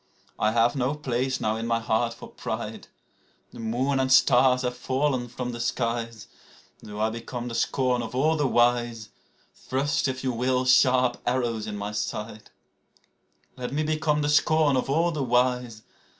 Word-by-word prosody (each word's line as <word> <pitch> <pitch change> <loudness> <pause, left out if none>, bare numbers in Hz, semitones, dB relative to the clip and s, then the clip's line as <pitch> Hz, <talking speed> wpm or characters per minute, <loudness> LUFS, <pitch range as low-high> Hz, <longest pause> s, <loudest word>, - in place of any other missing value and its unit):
I 110 - +2
have 120 +3 +3
no 135 +2 0
place 130 -2 -2
now 110 0 -1
in 115 +1 -4
my 115 0 +1
heart 115 +1 0
for - - -11
pride. - - -6 0.6
(The - - -12
moon 125 +5 0
and 130 0 0
stars 130 -1 +5
have 125 0 -2
fallen 130 0 -1
from 125 +1 -5
the 120 - -7
skies.) 115 -2 -2 0.6
Though 105 0 -9
I 110 +1 +1
become 120 +1 -6
the - - -6
scorn 125 +1 0
of 115 +1 -6
all 155 +5 +2
the 145 -3 +1
wise, 120 -3 +1 0.5
Thrust, 140 +2 -1
if 130 0 -4
you 130 - 0
will, 125 +2 0
sharp 125 -1 +4
arrows 120 -3 -1
in 105 -1 -5
my 100 +1 -4
side. 105 +1 -5 1.1
Let 125 -1 -5
me 150 +2 -1
become 155 -1 0
the 145 - 0
scorn 155 -1 +3
of 130 - -1
all 165 +5 +2
the 155 -3 -3
wise. 125 -2 0
125 Hz, 170 wpm, -26 LUFS, 115-130 Hz, 1.1 s, stars